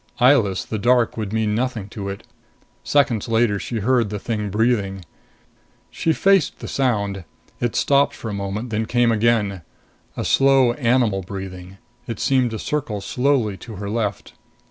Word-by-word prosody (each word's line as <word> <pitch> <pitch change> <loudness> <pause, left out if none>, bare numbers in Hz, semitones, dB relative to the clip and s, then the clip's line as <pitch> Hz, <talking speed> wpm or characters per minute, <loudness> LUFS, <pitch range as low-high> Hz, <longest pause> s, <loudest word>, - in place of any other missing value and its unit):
Eyeless, 120 -8 +3
the 110 - -4
dark 120 +2 +3
would 110 -3 -4
mean 110 -1 0
nothing 115 -3 -2
to 100 -1 -6
it. 100 - -7 0.6
Seconds 135 -7 +1
later, 115 -3 +2
she 110 +4 -4
heard 120 -1 +2
the 105 - -4
thing 105 -1 -3
breathing. 100 -3 0 0.9
She 165 - 0
faced 195 +1 +3
the - - -8
sound. 100 -8 -1 0.4
It 120 -2 -1
stopped 140 0 +3
for - - -8
a 105 - -4
moment, 100 +4 -4
then 110 0 0
it 110 - -4
came 120 0 +2
again. 105 -4 +1 0.6
A - - -2
slow 135 -3 +4
animal 120 -6 +1
breathing. 95 0 -8 0.3
It 115 -3 -5
seemed 130 +1 +2
to 110 - -5
circle 130 -4 -3
slowly 125 -2 0
to 115 +1 -10
her 100 +1 -5
left. 105 -4 -3
110 Hz, 165 wpm, -21 LUFS, 100-125 Hz, 0.9 s, slow